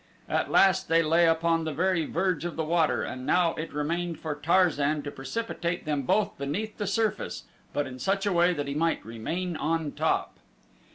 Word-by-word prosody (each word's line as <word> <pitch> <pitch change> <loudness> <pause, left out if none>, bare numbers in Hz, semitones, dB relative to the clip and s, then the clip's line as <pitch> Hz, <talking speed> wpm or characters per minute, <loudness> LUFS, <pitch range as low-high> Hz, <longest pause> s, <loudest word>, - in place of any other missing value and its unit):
At - - 0
last 190 -1 +4
they 165 0 +4
lay 165 +2 +4
upon 165 0 +2
the 160 - -2
very 175 -1 +1
verge 180 -2 0
of 175 -1 -4
the 160 - -1
water 160 0 +1
and 130 - -5
now 170 +4 +2
it 155 - -5
remained 165 +3 -2
for 155 -2 -3
Tarzan 150 -2 +2
to 145 - -5
precipitate 175 +3 -3
them 145 -4 -1
both 215 - +2
beneath 200 +12 -3
the 205 - -2
surface 215 +1 -1 0.3
but 145 - -1
in 130 -1 -8
such 195 - 0
a 200 - +1
way 175 +1 +4
that 145 -5 -3
he 140 - -2
might 165 +3 0
remain 165 +11 -4
on 160 -1 -1
top. - - -1
165 Hz, 190 wpm, -27 LUFS, 150-180 Hz, 0.3 s, last